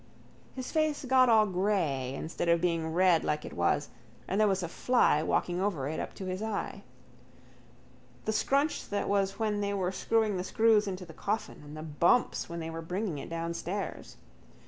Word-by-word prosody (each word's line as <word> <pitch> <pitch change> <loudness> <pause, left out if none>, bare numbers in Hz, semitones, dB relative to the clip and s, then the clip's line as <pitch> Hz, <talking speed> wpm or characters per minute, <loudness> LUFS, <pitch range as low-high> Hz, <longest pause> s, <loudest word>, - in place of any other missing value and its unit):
His 255 -1 -5
face 310 -3 0
got 255 -1 +5
all 220 -2 +6
grey 175 -10 0
instead 165 +3 -3
of 170 0 +4
being 165 -2 0
red 175 -1 +4
like 150 0 -1
it - - -8
was 85 +12 +1 0.4
and 195 +3 +1
there 215 - +5
was 190 -2 +1
a - - -2
fly 240 -4 +2
walking 175 +3 0
over 175 -10 -1
it 155 +2 -3
up - - -5
to 190 - -6
his 185 +1 -3
eye. 220 -1 -3 1.4
The 220 - 0
scrunch 280 +7 +1
that 205 - -1
was 195 -1 +1
when 215 -2 0
they 200 0 -1
were 185 -2 0
screwing 215 0 +1
the 180 - -2
screws 220 +1 +3
into 185 -1 -4
the 165 - -12
coffin: 210 +7 -3
and 150 +1 -10
the 155 - -6
bumps 165 +10 +2
when 170 0 -5
they 165 0 -5
were 165 0 -5
bringing 180 -1 -3
it - - -7
downstairs. 170 +4 -4
185 Hz, 190 wpm, -30 LUFS, 165-215 Hz, 1.4 s, all